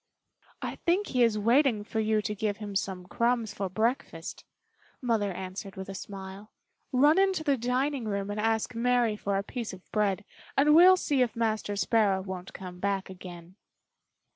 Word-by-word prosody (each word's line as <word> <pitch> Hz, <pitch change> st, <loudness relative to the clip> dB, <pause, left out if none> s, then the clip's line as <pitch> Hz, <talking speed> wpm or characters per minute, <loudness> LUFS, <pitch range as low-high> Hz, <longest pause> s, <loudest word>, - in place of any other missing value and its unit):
"I -, -, -4 dB
think 375 Hz, +4 st, +1 dB
he 250 Hz, -, +2 dB
is 230 Hz, -3 st, +4 dB
waiting 230 Hz, +1 st, +3 dB
for 220 Hz, +1 st, -3 dB
you 215 Hz, -1 st, +1 dB
to 210 Hz, -, -2 dB
give 210 Hz, 0 st, -2 dB
him 205 Hz, -2 st, -7 dB
some 190 Hz, -2 st, -2 dB
crumbs 235 Hz, +3 st, 0 dB
for 195 Hz, -1 st, -3 dB
breakfast," 220 Hz, -5 st, -2 dB, 0.6 s
Mother 225 Hz, -5 st, 0 dB
answered 190 Hz, +1 st, -6 dB
with 190 Hz, 0 st, -7 dB
a -, -, -5 dB
smile. 195 Hz, +1 st, -8 dB, 0.4 s
"Run 290 Hz, +6 st, +5 dB
into 385 Hz, -4 st, +2 dB
the 285 Hz, -3 st, +3 dB
dining 255 Hz, +2 st, -1 dB
room 200 Hz, -1 st, -2 dB
and 205 Hz, -, -3 dB
ask 225 Hz, +2 st, 0 dB
Mary 240 Hz, -1 st, +2 dB
for 200 Hz, -1 st, -1 dB
a 195 Hz, -, -1 dB
piece 235 Hz, 0 st, -5 dB
of 185 Hz, -1 st, -14 dB
bread 205 Hz, -2 st, 0 dB, 0.3 s
and 285 Hz, +2 st, +4 dB
we 335 Hz, +3 st, +8 dB
will 370 Hz, 0 st, +8 dB
see 285 Hz, -6 st, +1 dB
if 245 Hz, -2 st, +1 dB
Master 220 Hz, -2 st, -1 dB
Sparrow 200 Hz, -2 st, +2 dB
won't 185 Hz, -1 st, -6 dB
come 180 Hz, -1 st, -9 dB
back 195 Hz, 0 st, -1 dB
again." 180 Hz, 0 st, -11 dB
215 Hz, 180 wpm, -29 LUFS, 195-245 Hz, 0.6 s, we